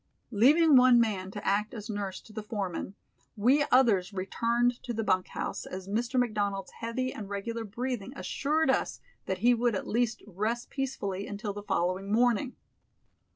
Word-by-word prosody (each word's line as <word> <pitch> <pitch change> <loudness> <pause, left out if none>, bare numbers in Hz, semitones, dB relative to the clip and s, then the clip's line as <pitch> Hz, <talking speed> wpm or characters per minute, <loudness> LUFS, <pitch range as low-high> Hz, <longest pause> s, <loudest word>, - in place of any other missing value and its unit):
Leaving 290 +8 +5
one 250 -1 +7
man 200 -5 0
to 205 +1 -8
act 210 +4 0
as 210 -2 -7
nurse 205 -3 -4
to 215 - -17
the 215 - -4
foreman, 200 -3 -4 0.4
we 255 +8 +4
others 215 -8 +4
returned 235 +5 0
to 240 - -4
the 225 - -1
bunk 185 -3 +1
house, - - -4
as 185 0 -7
Mr. 235 +5 0
McDonald's 205 -5 -1
heavy 255 +3 -2
and 205 -3 -7
regular 225 +3 -4
breathing 235 +1 -4
assured 300 +1 0
us - - -1 0.3
that 190 - -1
he 245 - +7
would 235 -1 +1
at - - -3
least 235 0 0
rest 215 +5 -3
peacefully 205 -8 -3
until 205 0 -4
the 205 - -6
following 185 0 -1
morning. 245 +3 +2
220 Hz, 165 wpm, -29 LUFS, 200-245 Hz, 0.4 s, one